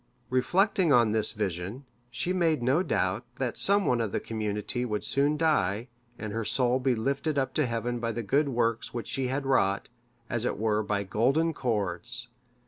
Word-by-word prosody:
Reflecting 175 - +2
on 120 -5 +5
this 110 -1 +2
vision, 105 +4 -4 0.2
she 135 +9 -2
made 165 -7 +1
no 135 +8 +3
doubt 95 - 0
that 125 -3 -2
some 200 0 +4
one 120 -2 +2
of 110 -3 -2
the - - -1
community 110 +2 -3
would 105 -4 -2
soon 145 +2 +2
die, 125 - +1 0.3
and 110 -2 -5
her 115 0 -2
soul 125 +3 +1
be 130 -1 +1
lifted 140 +6 -1
up 130 -1 0
to 150 -4 +1
heaven 120 +1 -2
by 115 0 -1
the 115 +1 -4
good 140 +7 +2
works 115 -2 -1
which 115 -5 -4
she 135 -1 -2
had 135 +2 -2
wrought, 100 -8 +1 0.4
as 120 -2 -1
it - - -1
were 110 0 +1
by 105 -1 -1
golden 135 +12 +1
cords. 120 - -2
120 Hz, 185 wpm, -28 LUFS, 110-140 Hz, 0.4 s, on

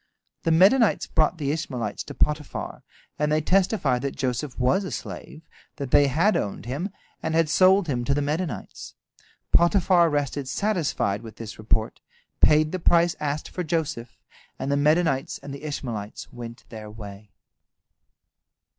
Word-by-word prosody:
The 165 - 0
Medanites 200 +8 +5
brought 155 +2 +1
the 145 -3 -1
Ishmaelites 125 -9 -3
to - - -9
Potiphar, 150 -1 -2 0.4
and 150 0 +1
they 155 - +3
testified 185 - +2
that 140 0 -3
Joseph 130 +1 -3
was 130 +10 +2
a 190 - -4
slave, 155 - -7 0.3
that 140 -3 -6
they 145 -1 +6
had 165 +11 +2
owned 100 - -3
him, 145 +11 -3 0.3
and 160 0 -2
had 165 -1 +3
sold 185 +3 +5
him 125 -4 -1
to 140 - +1
the 145 - 0
Medanites. 155 +1 -4 0.6
Potiphar 175 -1 +4
rested 145 -2 -2
satisfied 150 - -1
with 115 -2 -10
this 110 -2 -9
report, 110 0 -1 0.4
paid 155 0 +4
the 185 - -3
price 170 0 +3
asked 150 0 -3
for 180 - -4
Joseph, 155 -7 -3 0.4
and 135 +2 -3
the - - +3
Medanites 150 -1 +2
and 140 0 -7
the 140 - -8
Ishmaelites 120 -6 -5
went 120 -1 -9
their 110 -2 -8
way. 105 -1 -10
145 Hz, 155 wpm, -25 LUFS, 125-165 Hz, 0.6 s, they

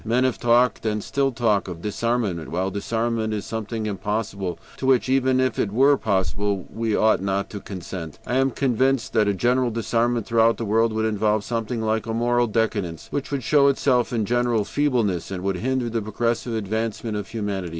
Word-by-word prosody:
"Men 120 +3 +1
have 130 -2 0
talked, 120 0 +3
and 105 -2 -1
still 140 -1 0
talk, 110 -5 +1
of 85 -2 -7
disarmament, 105 - -1
while 95 +4 -1
disarmament 110 +2 -1
is 105 - -4
something 110 0 -4
impossible, 100 -2 -3 0.2
to 130 - -3
which, 130 -2 +3
even 130 -1 +3
if 130 -2 0
it 100 - 0
were 135 +6 +5
possible, 95 - -1
we 115 -2 -1
ought 110 -3 +3
not 100 0 -1
to 105 - -5
consent. 90 -5 -7
I 125 - 0
am 135 0 +3
convinced 130 0 +1
that 105 -2 +3
a 100 - +2
general 125 +4 +2
disarmament 115 0 0
throughout 115 0 +3
the 115 - -3
world 115 +2 +2
would 110 0 0
involve 105 -1 +1
something 115 0 -3
like 110 0 0
a 115 - -2
moral 120 +1 +2
decadence, 105 -7 -2
which 140 - -3
would 140 -3 -2
show 140 +2 +4
itself 130 -3 +2
in 115 -3 0
general 120 -2 +1
feebleness, 120 - 0
and 95 -2 -5
would 95 -1 -1
hinder 130 +4 -1
the 115 -1 -2
progressive 115 +2 -1
advancement 110 +1 -2
of 105 - -4
humanity. 100 -5 -3
115 Hz, 190 wpm, -23 LUFS, 100-120 Hz, 0.2 s, were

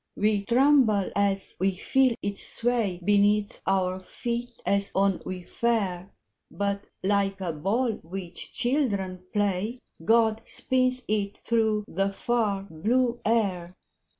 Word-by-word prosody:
We 210 -1 +1
tremble 245 -5 +4
as 200 -1 0
we 190 +1 +1
feel 260 +5 +2
it 200 0 -3
sway 230 -7 -1
Beneath 205 0 +2
our 185 -1 +1
feet 235 +5 -5
as 200 0 +1
on 195 -1 +2
we 185 -1 -5
fare; 195 -5 -1 0.4
But, 200 0 -2 0.2
like 195 0 +1
a 180 -4 -2
ball 215 +11 0
which 175 +1 -7
children 210 -9 0
play, 205 +2 0 0.3
God 225 +2 +3
spins 255 0 0
it 205 -1 -1
through 220 -2 +1
the 195 +3 0
far 210 -2 0
blue 235 +8 0
air. 190 -6 0
205 Hz, 125 wpm, -27 LUFS, 195-235 Hz, 0.4 s, tremble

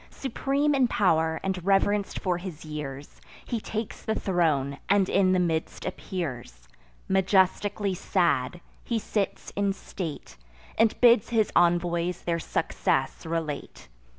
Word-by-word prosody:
Supreme 275 +3 0
in 265 -3 +3
pow'r, 160 -7 +2
and 190 -2 -2
reverenc'd 200 +1 +2
for 180 -2 -1
his 175 -4 -8
years, 145 -2 -7 0.2
He 235 - -2
takes 220 +1 -5
the 220 - -2
throne, 150 -7 +1
and 200 -2 +4
in 190 -1 +3
the 185 - +3
midst 165 -3 -1
appears. 130 - -5 0.4
Majestically 195 +1 +2
sad, 170 -3 0 0.2
he 235 - -1
sits 210 -2 -2
in 200 -1 +1
state, 165 - -7 0.4
And 225 -1 +2
bids 235 -3 +6
his 225 -3 +2
envoys 175 0 +2
their 170 -1 0
success 165 - -1
relate. 155 - -4
185 Hz, 125 wpm, -27 LUFS, 160-205 Hz, 0.4 s, bids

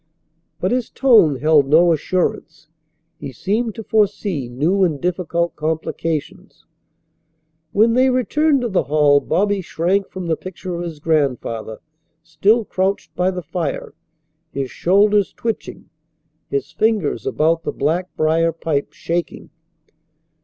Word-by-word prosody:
But 185 - 0
his 250 -1 -1
tone 225 - +4
held 150 0 +3
no 165 +4 +5
assurance. 160 -1 -2 0.5
He 140 - -6
seemed 215 - -2
to 225 - -7
foresee 200 - 0
new 160 +11 +1
and 160 -6 0
difficult 170 0 -1
complications. 160 0 -4 1.1
When 225 +3 +3
they 255 +2 +4
returned 275 +3 +2
to 240 - -1
the 190 -5 0
hall 145 -1 +4
Bobby 200 +6 0
shrank 185 +3 -1
from 185 -1 -6
the 165 -1 0
picture 185 +1 -7
of 170 - -4
his 170 -3 -6
grandfather 130 -8 -1 0.4
still 195 +9 +2
crouched 190 +1 -2
by 180 +1 +1
the 180 -1 -4
fire, 165 -1 -4 0.6
his 135 -2 -4
shoulders 205 +2 +2
twitching, 225 -2 -5 0.6
his 140 +2 -3
fingers 215 -7 0
about 165 +2 +1
the - - -3
black 170 +6 -1
briar 165 +2 +2
pipe 155 -3 -3
shaking. 170 -3 -4
170 Hz, 130 wpm, -19 LUFS, 155-200 Hz, 1.1 s, no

